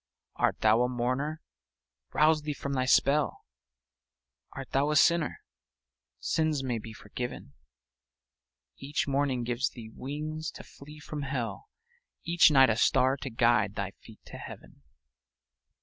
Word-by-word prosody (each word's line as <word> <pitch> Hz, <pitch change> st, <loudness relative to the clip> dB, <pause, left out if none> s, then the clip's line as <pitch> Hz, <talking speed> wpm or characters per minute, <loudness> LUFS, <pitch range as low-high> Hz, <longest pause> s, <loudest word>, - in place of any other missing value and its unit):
Art -, -, 0 dB
thou 110 Hz, +2 st, +4 dB
a 125 Hz, -, +2 dB
mourner? 130 Hz, +6 st, -2 dB, 0.7 s
Rouse 155 Hz, 0 st, +3 dB
thee 150 Hz, -1 st, -4 dB
from 140 Hz, 0 st, -4 dB
thy 130 Hz, -1 st, 0 dB
spell; 140 Hz, +3 st, +2 dB, 1.1 s
Art 135 Hz, -1 st, -8 dB
thou 140 Hz, +2 st, +2 dB
a 150 Hz, -, +1 dB
sinner? 170 Hz, +1 st, +3 dB, 0.8 s
Sins 155 Hz, -3 st, 0 dB
may 120 Hz, -3 st, -2 dB
be 110 Hz, +1 st, -9 dB
forgiven; 110 Hz, -, -7 dB, 1.2 s
Each 140 Hz, +2 st, -2 dB
morning 135 Hz, -3 st, 0 dB
gives 120 Hz, +3 st, -1 dB
thee 110 Hz, -3 st, -11 dB
wings 155 Hz, +3 st, -5 dB
to -, -, -10 dB
flee 150 Hz, +2 st, -13 dB
from 145 Hz, 0 st, -6 dB
hell, 135 Hz, -, -4 dB, 0.5 s
Each 170 Hz, 0 st, +5 dB
night 135 Hz, -4 st, +6 dB
a 110 Hz, -, -1 dB
star 130 Hz, +2 st, +3 dB
to 135 Hz, 0 st, -6 dB
guide 115 Hz, -3 st, +2 dB
thy 100 Hz, -2 st, -3 dB
feet 110 Hz, +2 st, -17 dB
to -, -, -10 dB
heaven. -, -, -11 dB
135 Hz, 135 wpm, -29 LUFS, 120-150 Hz, 1.2 s, night